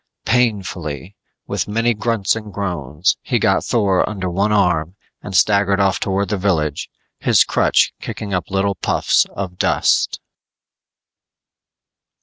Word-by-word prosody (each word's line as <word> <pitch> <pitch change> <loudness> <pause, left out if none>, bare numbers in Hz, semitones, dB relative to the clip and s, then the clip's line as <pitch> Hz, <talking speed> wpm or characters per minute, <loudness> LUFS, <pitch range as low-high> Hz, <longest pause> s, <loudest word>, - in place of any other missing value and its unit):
Painfully, 95 - -1 0.3
with - - -3
many 115 +3 +1
grunts 110 -2 0
and 110 -2 -7
groans, 85 -4 -1
he - - 0
got - - +2
Thor 100 -6 +1
under 95 -4 -4
one 100 +4 0
arm 90 -4 +1 0.3
and 95 -3 -2
staggered 100 +1 +3
off 95 -1 +2
towards 100 +1 -1
the 105 - 0
village, 80 -7 -1 0.3
his - - +4
crutch - - +2
kicking 100 -2 -6
up 90 -2 -2
little 100 +1 0
puffs 85 - +1
of 90 -2 -5
dust. - - +1
100 Hz, 130 wpm, -19 LUFS, 90-105 Hz, 0.3 s, his